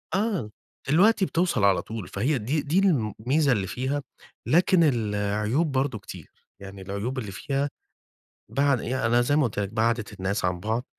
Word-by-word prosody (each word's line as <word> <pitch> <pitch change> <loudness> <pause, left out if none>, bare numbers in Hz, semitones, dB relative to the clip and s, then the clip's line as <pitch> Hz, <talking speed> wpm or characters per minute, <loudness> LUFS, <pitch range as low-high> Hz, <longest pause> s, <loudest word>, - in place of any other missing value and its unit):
آه، 195 - -1 0.4
دلوقتي 195 +6 +4
بتوصل 170 - 0
على 100 -2 +4
طول، 110 -5 -7
فهي 130 +8 0
دي 135 +8 -1
دي 155 +7 +1
الميزة 135 - +1
اللي 100 -5 0
فيها، 135 +6 -2 0.4
لكن 175 +1 +4
العيوب 105 +2 0
برضو 130 -4 -1
كتير، - - -10 0.3
يعني 100 0 -10
العيوب 100 +7 -4
اللي 105 -5 -6
فيها 140 +7 -2 0.8
بعد 140 -2 +2
يعني 130 -1 -2
أنا 120 +2 +3
زي 145 +4 +1
ما 150 - +3
قُلت 110 -4 -2
لك 100 - -1
بعَّدِت 115 0 0
الناس 95 +1 -2
عن 90 -1 -1
بعض، 110 +5 -2
120 Hz, 165 wpm, -26 LUFS, 105-145 Hz, 0.8 s, دلوقتي